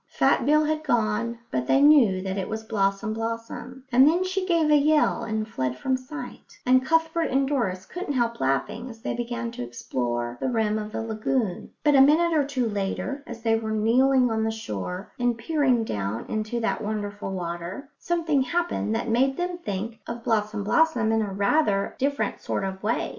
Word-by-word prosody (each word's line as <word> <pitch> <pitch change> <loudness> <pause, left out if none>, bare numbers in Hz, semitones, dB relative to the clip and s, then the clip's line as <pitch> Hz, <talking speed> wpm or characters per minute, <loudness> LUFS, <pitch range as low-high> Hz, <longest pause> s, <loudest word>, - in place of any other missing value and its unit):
Fat - - +2
Bill 305 +1 +4
had 310 0 -1
gone, 235 -2 0
but 125 -1 -1
they - - +4
knew 265 -11 +5
that 190 -1 -3
it 195 -2 -3
was 220 0 -4
Blossom 200 0 0
blossom, 230 +3 -5
and 260 +3 +6
then 345 +4 +3
she 370 0 -2
gave 330 -4 +3
a - - +7
yell 300 +1 +3
and 220 0 -2
fled 130 - -3
from 260 - 0
sight; 260 +4 -9
and 255 +1 +4
Cuthbert 325 +2 +1
and 270 +1 +2
Doris 195 -10 -1
couldn't 355 - -4
help 235 -3 0
laughing 205 - -1
as 225 -1 -12
they - - -2
began 240 0 -3
to - - -7
explore 120 0 -3
the - - 0
rim 220 -3 +1
of 210 0 -6
the 225 - -3
lagoon. 220 -2 -2
But 295 - +4
a 270 - +7
minute 320 +4 +4
or 300 - +4
two 270 -4 -1
later, 210 +7 -3
as 235 -1 -8
they 225 -1 +3
were 225 -1 -3
kneeling 250 +3 +3
on 220 0 0
the 220 - +1
shore 180 - -5
and 245 -1 +1
peering 255 -2 +1
down 105 - -3
into 215 +2 -2
that 225 - -1
wonderful 205 -2 -4
water, 180 - -5
something 330 -5 +1
happened 300 -6 -1
that 230 - -2
made 260 +4 +2
them 355 0 -2
think 215 - -4
of 235 0 -6
Blossom 215 -2 0
blossom 240 -1 +2
in 225 0 +2 0.2
rather 200 -2 +2
a - - -25
different 280 +2 -1
sort - - -2
of 190 0 -4
way. 220 +3 0
230 Hz, 195 wpm, -25 LUFS, 210-275 Hz, 0.2 s, a